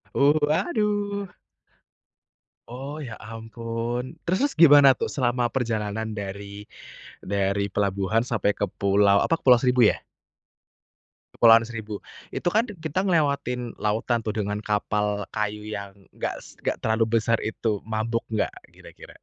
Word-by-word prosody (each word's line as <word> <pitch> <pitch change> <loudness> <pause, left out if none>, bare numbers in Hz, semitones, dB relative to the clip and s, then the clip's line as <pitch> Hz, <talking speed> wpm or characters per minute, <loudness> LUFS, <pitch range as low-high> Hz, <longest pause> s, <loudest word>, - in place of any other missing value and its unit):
Oh, 140 +1 +5
waduh. 205 - 0 1.4
Oh, 135 +5 -7
ya 120 -7 -6
ampun. 115 +4 -5
Terus 185 +2 +2
terus 285 - 0
gimana 145 -3 +8
tuh - - -2
selama 120 -2 +1
perjalanan 110 -4 -2
dari 100 0 -7 0.6
dari 100 0 -1
pelabuhan 100 +2 +1
sampai 105 -3 +1
ke 105 - +2
pulau 100 0 +4
apa, 165 - +2
Pulau 125 -2 +6
Seribu, 125 -3 +4
ya? - - -6 1.4
Kepulauan 115 -1 +6
Seribu, 110 -3 -6 0.3
itu - - -4
kan 215 +6 +3 0.2
kita 160 +4 -2
ngelewatin 140 -9 0
lautan 115 +2 0
tuh 110 - -2
dengan 105 0 -3
kapal 105 -1 -1
kayu 105 0 -3
yang 100 -2 -5 0.2
nggak - - -2
s - - -15
nggak - - -1
terlalu 110 +1 +1
besar 115 +1 +1
itu. 110 -2 -2
Mabuk 115 +1 -2
nggak 110 - 0 0.2
kira-kira? - - -14
115 Hz, 130 wpm, -25 LUFS, 105-130 Hz, 1.4 s, gimana